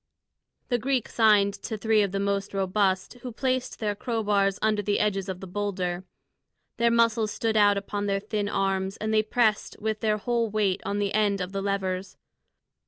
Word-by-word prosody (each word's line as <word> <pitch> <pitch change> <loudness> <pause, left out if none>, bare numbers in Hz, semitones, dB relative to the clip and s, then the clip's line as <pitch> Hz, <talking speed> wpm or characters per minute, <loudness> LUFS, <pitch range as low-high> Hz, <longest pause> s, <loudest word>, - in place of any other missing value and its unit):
The 245 -2 +1
Greek 260 0 0
signed 210 -3 +4
to 220 - -4
three 220 +1 +3
of 200 -2 0
the 195 - -2
most 200 0 -1
robust, 190 0 0
who 250 - -6
placed 255 +1 -2
their 210 -2 -1
crow 225 +2 -3
bars 200 -1 +2
under 215 -1 +1
the 205 0 0
edges 195 -2 0
of 185 -1 -5
the - - -6
boulder. 185 -2 -3 0.7
Their 235 0 +3
muscles 230 -1 +2
stood 220 +1 -1
out 205 -1 +5
upon 205 +1 -3
their 195 0 +1
thin 210 0 -3
arms, 195 -1 -1
and 215 +1 -2
they 215 - +5
pressed 215 0 0
with 215 0 -2
their 215 -1 +1
whole 235 +1 0
weight 205 -2 0
on 200 0 -1
the 200 -1 -1
end 205 -2 +2
of 180 0 -4
the 195 0 -3
levers. 190 -1 -2
205 Hz, 190 wpm, -26 LUFS, 195-220 Hz, 0.7 s, out